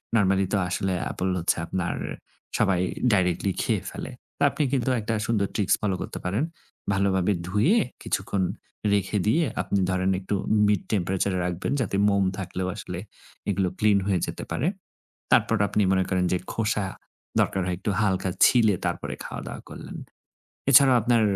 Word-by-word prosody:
Normally 95 -2 +3
তো - - +4
আসলে 95 +1 -1
Apple 95 - -2
হচ্ছে 85 - +1
আপনার 90 0 -2 0.6
সবাই 95 -2 +2 0.3
directly 95 0 +1
খেয়ে - - 0
ফেলে। - - -7 0.3
তো - - -22
আপনি - - -1
কিন্তু 130 -1 +1
একটা 110 +2 -2
সুন্দর 105 -4 +1
ট্রিকস 100 -3 +3
ফলো 100 -3 0
করতে - - -5
পারেন। 100 +9 0 0.5
ভালোভাবে 95 0 +2 0.2
ধুয়ে 105 - +3 0.3
কিছুক্ষণ 95 -2 -1 0.5
রেখে 100 +1 +1
দিয়ে 160 +9 +3 0.2
আপনি 100 - 0
ধরেন 95 +1 +1
একটু 95 +2 -2 0.3
mid 105 -2 +2
temperature 95 0 0
এ - - 0
রাখবেন 90 -1 -2
যাতে 100 -5 -1
মোম 100 -1 +2
থাকলেও 95 -1 -3
আসলে - - -6 0.5
এগুলো 95 -2 +1
ক্লিন 105 -2 +4
হয়ে 95 -3 +2
যেতে - - -5
পারে। 145 - 0 0.6
তারপর 115 - +4
আপনি 105 - +1
মনে 95 -1 +3
করেন 90 -1 +1
যে, 90 - +3 0.2
খোসা 105 -2 0 0.5
দরকার 95 - +1
হয় 90 - 0
একটু 100 - -1
হালকা 95 -2 +1 0.2
ছিলে 115 -4 +5
তারপরে - - -2
খাওয়া-দাওয়া - - -6
করলেন। - - -8 0.7
এছাড়াও 135 -1 +7
আপনার 120 +1 +3
100 Hz, 155 wpm, -25 LUFS, 95-105 Hz, 0.7 s, এছাড়াও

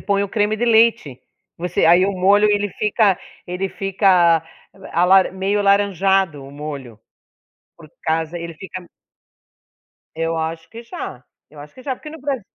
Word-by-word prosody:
põe 200 0 0
o 200 - -3
creme 215 0 0
de 240 - -1
leite. 220 - +2 0.4
Você 175 -1 -1
aí 175 +3 +5
o 200 - -1
molho, 200 +3 +3
ele 205 0 +1
fica 210 -3 +2 0.3
ele 180 +2 -3
fica 185 -5 +2 0.3
l 195 - -13
alaran 185 +3 +4
meio 195 +2 -1
alaranjado, 195 -5 +2
o 135 - -11
molho. 140 -6 -8 0.8
Por 160 -3 -15 0.2
casa, 160 +1 -1
ele 170 -1 -7
fica 185 +1 -9 1.3
Eu 165 +1 -2
acho 160 0 -4
que 230 +1 -10
já. 125 - -8 0.2
Eu 150 - -17
acho 145 0 -13
que 255 - -13
já, 265 -1 -3
porque 305 +4 -11
no 320 -2 -11
Bras 275 -3 -2
190 Hz, 165 wpm, -20 LUFS, 165-205 Hz, 1.3 s, aí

